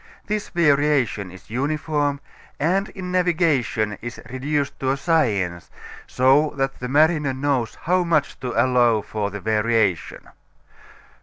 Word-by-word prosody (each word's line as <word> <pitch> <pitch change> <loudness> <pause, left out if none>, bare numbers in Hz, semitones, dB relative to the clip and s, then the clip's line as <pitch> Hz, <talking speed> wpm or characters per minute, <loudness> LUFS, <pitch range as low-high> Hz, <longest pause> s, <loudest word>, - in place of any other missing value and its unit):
This 210 0 -3
variation 145 - +1
is 95 +3 -15
uniform 145 +2 -1 0.4
and 190 +7 +1
in 185 -2 -7
navigation 155 - +1
is 120 +1 -7
reduced 140 +2 -2
to 130 - -1
a 135 - +1
science, 105 - 0 0.4
so 135 +4 +3
that 135 0 -2
the 125 - -4
mariner 150 -1 +3
knows 135 -4 -1
how 180 +2 +2
much 165 -4 0
to 125 - -4
allow 120 -3 +3
for 105 -1 -3
the 105 +1 -7
variation. 110 -3 0
135 Hz, 130 wpm, -22 LUFS, 115-155 Hz, 0.4 s, so